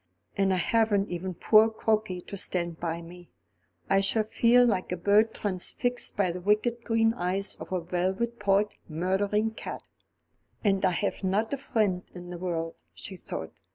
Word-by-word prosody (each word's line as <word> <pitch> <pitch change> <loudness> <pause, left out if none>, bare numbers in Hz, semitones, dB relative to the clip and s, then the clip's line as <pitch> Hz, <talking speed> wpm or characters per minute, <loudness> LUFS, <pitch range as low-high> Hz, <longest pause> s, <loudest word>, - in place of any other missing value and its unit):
And 195 -1 +2
I 185 - +2
haven't 210 0 +2
even 180 +1 -4
poor 215 +5 +5
Crokey 215 -4 -1
to - - -7
stand 170 -3 -2
by 170 0 -3
me. 175 +1 -12 0.6
I 195 - +4
shall 215 +3 +2
feel 235 +3 +4
like 195 -7 0
a 180 - -1
bird 205 +5 +4
transfixed 215 +5 -2
by 190 -3 +2
the 180 +1 -6
wicked 215 +5 +1
green 225 -1 +2
eyes 190 +1 -1
of - - -9
a 185 -1 0
velvet 190 +7 -1
pawed 205 0 +3 0.2
murdering 195 +6 0
cat." 220 - -7 0.8
"And 195 -3 +2
I - - +5
have 195 +3 -2
not 205 +6 0
a - - 0
friend 210 -8 0
in 175 0 -8
the 175 - -6
world," 165 -2 -3 0.2
she 195 - -5
thought. 80 - -6
195 Hz, 170 wpm, -28 LUFS, 180-220 Hz, 0.8 s, poor